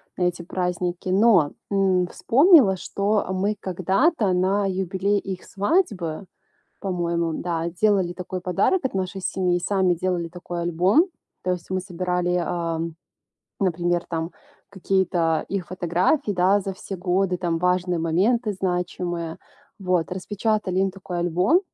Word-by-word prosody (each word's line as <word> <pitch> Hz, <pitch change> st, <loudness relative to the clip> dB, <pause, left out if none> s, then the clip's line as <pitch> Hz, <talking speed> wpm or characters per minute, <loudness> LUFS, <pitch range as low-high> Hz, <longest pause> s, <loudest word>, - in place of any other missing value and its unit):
на 180 Hz, -, -1 dB
эти 180 Hz, -1 st, 0 dB
праздники, 180 Hz, 0 st, -3 dB
но, 190 Hz, -6 st, +4 dB, 0.2 s
м, 190 Hz, -2 st, +2 dB
вспомнила, 265 Hz, -, +5 dB
что, 200 Hz, +3 st, 0 dB
а, 185 Hz, -, -2 dB
мы 200 Hz, +3 st, 0 dB
когда-то 195 Hz, -, +1 dB
на 190 Hz, +3 st, +2 dB
юбилей 190 Hz, +2 st, 0 dB
их 190 Hz, -2 st, -6 dB
свадьбы, 200 Hz, -, -1 dB, 0.5 s
по-моему, 170 Hz, -3 st, -1 dB
да, 170 Hz, -1 st, -2 dB
делали 185 Hz, 0 st, +2 dB
такой 180 Hz, 0 st, -6 dB
подарок 185 Hz, -, +1 dB
от 265 Hz, -, -1 dB
нашей 190 Hz, +1 st, -3 dB
семьи. 180 Hz, -1 st, 0 dB
Сами 190 Hz, 0 st, +2 dB
делали 175 Hz, -1 st, -1 dB
такой 175 Hz, 0 st, -6 dB
альбом. 180 Hz, -, +3 dB, 0.4 s
То 185 Hz, -, 0 dB
есть 180 Hz, -2 st, -4 dB
мы 185 Hz, 0 st, 0 dB
собирали, 180 Hz, -1 st, -1 dB
а, 165 Hz, -2 st, -2 dB, 0.8 s
например, 175 Hz, -2 st, 0 dB
там 165 Hz, 0 st, -3 dB, 0.4 s
какие-то 180 Hz, -4 st, +1 dB
их 195 Hz, -3 st, -3 dB
фотографии, 185 Hz, -, +1 dB
да, 190 Hz, +2 st, +3 dB
за 195 Hz, 0 st, -4 dB
все 195 Hz, +1 st, -7 dB
годы, 180 Hz, +1 st, 0 dB
там 170 Hz, -2 st, -1 dB
важные 180 Hz, 0 st, +1 dB
моменты, 210 Hz, +8 st, +1 dB
значимые, 175 Hz, -2 st, -2 dB, 0.4 s
вот. 180 Hz, -4 st, 0 dB
Распечатали 200 Hz, +1 st, -1 dB
им 195 Hz, 0 st, +2 dB
такой 185 Hz, -2 st, -6 dB
альбом, 180 Hz, -, +3 dB
185 Hz, 135 wpm, -24 LUFS, 175-195 Hz, 0.8 s, вспомнила